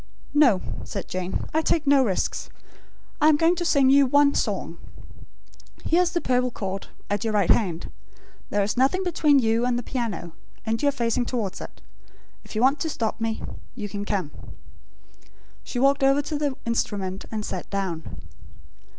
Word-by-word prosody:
"No," 260 -11 +5 0.2
said 195 - -6
Jane. 185 0 -3
"I 315 - +3
take 315 0 +1
no 280 -1 +5
risks. 195 -7 -1 0.7
I 305 - +6
am 310 - +5
going 330 +3 +4
to 350 - -1
sing 280 -5 +4
you 280 0 +6
one 285 +2 +4
song. - - -2 1.1
Here 340 +2 +3
is 355 -1 0
the 345 - +1
purple 250 0 +1
cord, 195 -4 -5 0.2
at 205 +2 -1
your 220 -1 -1
right 200 -4 +3
hand. 180 -7 0 0.6
There 205 0 +1
is 200 0 -1
nothing 275 +9 +2
between 310 -5 +3
you 230 -2 +2
and 245 -1 +1
the 245 - -3
piano; 225 -10 -4 0.3
and 225 0 -1
you 290 - +4
are - - +1
facing 240 -2 0
towards 215 -7 -3
it. - - -10 0.6
If - - -12
you 215 - 0
want 275 +3 +4
to 320 - -2
stop 225 -5 -3
me 225 -1 -2 0.3
you 210 -4 -4
can 205 0 -5
come." 190 -7 -2 1.3
She - - -6
walked 275 +2 +3
to 270 -1 +5
the 290 -1 -1
instrument, 200 -5 -2
and 215 -2 -3
sat - - -5
down. 190 -5 -4
245 Hz, 175 wpm, -25 LUFS, 205-285 Hz, 1.3 s, I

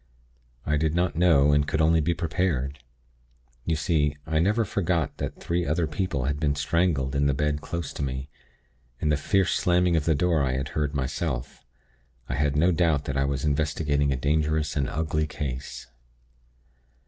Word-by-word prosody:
I 75 0 +1
did 80 +1 0
not 90 0 +1
know, 80 -5 +4
and 75 0 +2
could 75 - -1
only 80 +1 +4
be 85 +3 0
prepared. 80 -5 -1 0.9
You 80 - +1
see, 75 -1 0
I 80 0 0
never 105 +6 +2
forgot 85 -6 -1
that - - -5
three 85 +1 -1
other 80 +2 0
people 75 -2 -2
had 70 +1 -1
been 75 -2 +1
strangled 75 -2 0
in 70 0 +2
the 70 - +1
bed 75 +1 -1
close 85 -2 -5
to - - -6
me, 65 0 -3 0.7
and 75 - +1
the - - +3
fierce 95 +5 +1
slamming 90 -1 +2
of 80 -3 +1
the 80 - +3
door 85 +1 +2
I 65 -2 0
had 65 +2 -2
heard 75 -1 -2
myself. 70 -1 -3 0.6
I - - -3
had 70 +2 0
no 85 +5 +4
doubt 80 -4 +1
that 70 - -3
I 70 0 +2
was 70 +1 -2
investigating 75 -1 +1
a - - +1
dangerous 75 +2 0
and 70 -3 0
ugly 75 +1 -1
case. 70 -3 -5
75 Hz, 180 wpm, -26 LUFS, 70-85 Hz, 0.9 s, know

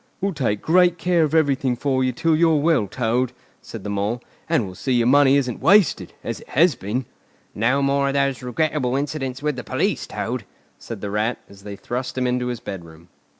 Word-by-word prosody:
"We'll 195 0 -1
take 115 -9 -1
great 175 +1 +4
care 175 0 +2
of 155 +1 0
everything 140 -5 +2
for 130 +1 0
you 130 - +1
till 160 +5 +1
you're 165 0 +4
well, 145 -8 +2
Toad," 125 +3 -1 0.3
said 110 -4 -9
the 105 - -4
Mole; 100 +4 -1 0.3
"and 160 -10 +2
we'll 95 - -8
see 130 +8 -2
your 120 -1 +3
money 140 +1 +5
isn't 125 -4 -2
wasted, 205 -2 +4
as - - -4
it - - -17
has 165 +3 +4
been." 110 +7 -3 0.5
"No 130 +6 +1
more 140 0 +2
of 140 - -1
those 140 -2 +1
regrettable 130 +1 -1
incidents 135 -2 -3
with 150 -3 -1
the 125 - -5
police, - - -1
Toad," - - -4 0.4
said 115 -4 -8
the 100 - -4
Rat, 110 +3 0
as 100 0 -16
they 100 0 -7
thrust 125 +5 -5
him 130 - 0
into 125 0 0
his 120 -2 -3
bedroom. 85 -4 -9
130 Hz, 205 wpm, -22 LUFS, 115-145 Hz, 0.5 s, money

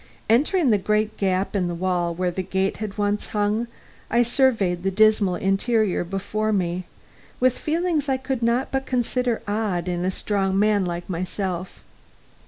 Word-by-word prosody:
Entering 290 +4 +3
the 210 - +3
great 215 +2 0
gap 190 +1 0
in 185 -3 +1
the 175 - -3
wall 175 -1 -1
where 180 0 -1
a 190 - -1
gate 190 +1 -1
had 215 -2 -5
once 205 0 0
hung, 210 +2 0 0.4
I 235 +1 +4
surveyed 230 -8 +2
the 195 - 0
dismal 205 -2 +3
interior 200 +1 +1
before 200 +4 -2
me, 180 -2 -1 0.5
with 255 0 +3
feelings 320 -2 0
I 265 - +2
could 260 -1 -3
not 235 +3 +1
but 270 0 -2
consider 250 -1 0
odd 205 -4 -1
in 175 -1 -1
a 185 - +1
strong 195 0 -1
man 205 -1 +3
like 175 0 -4
myself. 185 0 -4
205 Hz, 165 wpm, -23 LUFS, 185-235 Hz, 0.5 s, I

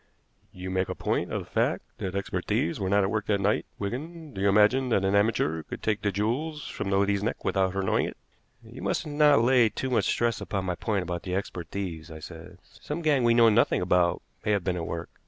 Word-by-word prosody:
You 95 0 -7
make 95 0 0
a - - -3
point - - -1
of - - -2
the - - -18
fact - - +1 0.2
that 95 0 -4
expert 100 - -3
thieves 85 - 0
were 95 -2 -1
not 100 +1 +3
at 95 - 0
work 110 -1 -2
that 100 -2 +2
night, 100 +2 +1
Wigan. 150 +9 -5
Do 95 - -5
you 100 - +4
imagine 105 +6 +4
that 100 -5 +2
an 95 - +1
amateur 100 -6 +2
could - - -9
take 110 -1 0
the 105 - 0
jewels 130 - -2
from 95 - -4
the 95 - +2
lady's 100 0 +2
neck 110 +3 -3
without 95 -1 +1
her 95 - 0
knowing 95 - +1
it?" - - -8 0.5
"You - - -11
must - - -1
not 145 -4 +4
lay 120 -2 +5
too 130 +5 -4
much 125 - +2
stress 120 -1 0
upon 95 -2 -3
my 90 - 0
point 100 +2 -1
about 90 -1 -4
the 90 -1 -3
expert 90 -3 -4
thieves," 85 -5 -5
I 80 - -8
said. 80 0 -10
"Some 160 +3 -7
gang 145 -5 +3
we 120 0 +4
know 115 -1 +7
nothing 110 +2 +3
about 90 -1 +2 0.2
may 105 - +1
have 100 -3 0
been 90 -1 0
at 85 -2 -4
work. 85 0 -5
100 Hz, 245 wpm, -27 LUFS, 95-115 Hz, 0.5 s, know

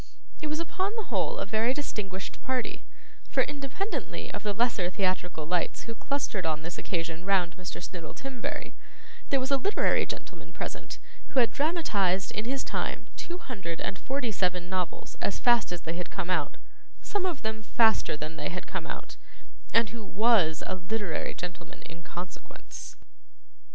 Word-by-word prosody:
It 310 - -1
was 305 +1 0
upon 380 +5 0
the 440 -3 -4
whole - - +2
a - - 0
very 225 +5 +3
distinguished 195 -10 -3
party, 260 -2 -1 0.5
for - - +4
independently 295 - -3
of - - -3
the 210 - +1
lesser 205 -4 +2
theatrical 185 -4 0
lights 175 +1 +1
who 230 - -4
clustered 230 -5 0
on 155 -1 0
this 170 +1 -4
occasion 165 -1 -2
round 185 -3 +3
Mr. 185 -2 -5
Snittle 170 -3 -6
Timberry, 270 -3 -3 0.6
there 275 - +4
was 260 +2 -1
a 275 - +6
literary 400 +10 +3
gentleman - - -6
present - - -4 0.3
who 265 - +3
had 235 - +5
dramatised 210 - +2
in 215 - -1
his 270 +2 0
time - - -2
two 350 - -4
hundred 195 - -4
and 195 - -2
forty 260 -3 0
seven 180 -2 +1
novels 185 -2 -2
as - - +1
fast 240 -7 +5
as 175 -1 -2
they 165 - -2
had 175 +1 -3
come 185 -2 -2
out 160 -5 +1 0.5
some 405 -2 0
of 355 -6 -1
them 220 0 -1
faster 220 -7 +4
than 155 +2 -4
they - - -1
had 180 - -4
come - - -3
out - - -6 0.5
and 230 -3 +5
who 230 -1 -5
WAS 205 -7 +4
a - - -1
literary 185 -1 -1
gentleman 180 0 -6
in 165 0 -9
consequence. 175 +2 -7
205 Hz, 170 wpm, -30 LUFS, 180-260 Hz, 0.6 s, a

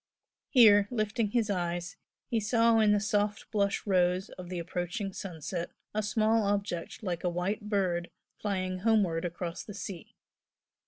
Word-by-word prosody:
Here, 205 -6 +7
lifting 215 -1 0
his 220 -1 +1
eyes, 175 -1 -2 0.3
he 235 -3 0
saw 230 +1 +3
in 215 -1 +5
the 210 - +4
soft 205 0 -1
blush 200 -2 0
rose 185 0 +2
of 180 -1 -10
the 180 - -4
approaching 180 +4 -3
sunset 175 -1 -5 0.2
a 215 - 0
small 215 +1 +2
object 200 0 -2
like 175 -4 -3
a 180 - +2
white 190 +4 -2
bird 180 -4 0 0.3
flying 185 -3 -2
homeward 195 -6 +2
across 170 0 -4
the 205 - -9
sea. 195 -4 -7
200 Hz, 150 wpm, -30 LUFS, 180-215 Hz, 0.3 s, Here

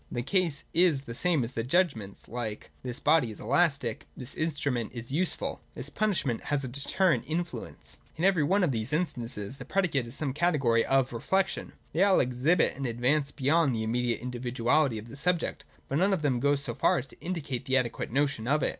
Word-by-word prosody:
The 120 - -2
case 175 -1 0
is 165 -5 +4
the 120 -4 -8
same 165 +3 +2
with 120 +2 -4
judgments 130 - 0
like: 115 -3 -5
This 125 0 -3
body 150 -5 +3
is 110 - -9
elastic: 140 -2 +1
This 130 +1 -6
instrument 145 -7 -1
is 120 +2 -5
useful: 175 +5 -1
This 135 +4 -6
punishment 150 - 0
has 145 -2 0
a - - -3
deterrent 150 +7 +1
influence. 170 +2 -5 0.2
In 160 - -4
every 190 -4 +4
one 190 +6 +2
of 165 - +2
these 115 +3 -3
instances 125 - -2
the 130 - -7
predicate 150 -8 0
is 115 - -6
some 140 -3 -2
category 140 -8 +2
of 135 -2 +2
reflection. 190 +11 -1 0.2
They 165 - +1
all 200 -1 +5
exhibit 130 +7 +2
an 135 0 -3
advance 130 +5 +1
beyond 145 -1 +2
the 110 - -1
immediate 120 +1 0
individuality 125 +1 +1
of 110 +2 -7
the 120 - -10
subject, 175 +4 0 0.2
but 140 - 0
none 195 +2 +3
of 170 -5 -1
them 130 -4 +2
goes 140 +2 +2
so 120 - -3
far - - +2
as 130 - -2
to 135 - -17
indicate 150 -8 -4
the 130 0 +3
adequate 120 -3 -1
notion 135 -4 0
of 150 +1 +2
it. - - +3
140 Hz, 200 wpm, -29 LUFS, 120-165 Hz, 0.2 s, all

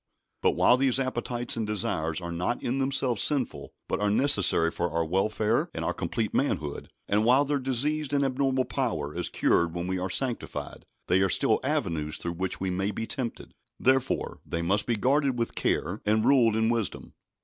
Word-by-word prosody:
But - - +2
while 125 - +5
these 130 -1 +2
appetites 120 -2 -2
and 110 -2 -2
desires 80 -6 -1
are 85 0 -5
not 90 +8 -2
in 130 +3 -1
themselves 135 -5 +1
sinful, 125 - 0 0.2
but - - -1
are 105 0 +1
necessary 100 - +3
for 85 +1 -2
our 85 0 -1
welfare 105 +6 0
and - - -3
our - - 0
complete 110 -2 -3
manhood, 80 - -1 0.2
and 105 +2 +2
while 130 +5 +4
their 145 0 0
diseased 140 +3 -1
and 140 -1 +2
abnormal 135 -1 0
power 110 - -2
is - - -2
cured 85 0 +1
when 85 0 -3
we 95 0 -2
are 95 +1 -3
sanctified, 125 +4 -3 0.2
they 90 +2 +2
are 95 - +2
still - - +3
avenues 75 -2 -1
through 85 - -4
which 90 +2 -3
we 95 -1 -2
may 95 +2 -1
be 110 +2 -3
tempted. 120 0 -4 0.3
Therefore, 130 0 +1
they 85 - -3
must 100 +5 +1
be 120 - +1
guarded 135 +3 +1
with 115 -1 -2
care 95 +5 -1
and 110 +1 +2
ruled 120 -5 +4
in 110 0 +2
wisdom. 115 -4 -2
110 Hz, 190 wpm, -27 LUFS, 90-130 Hz, 0.3 s, while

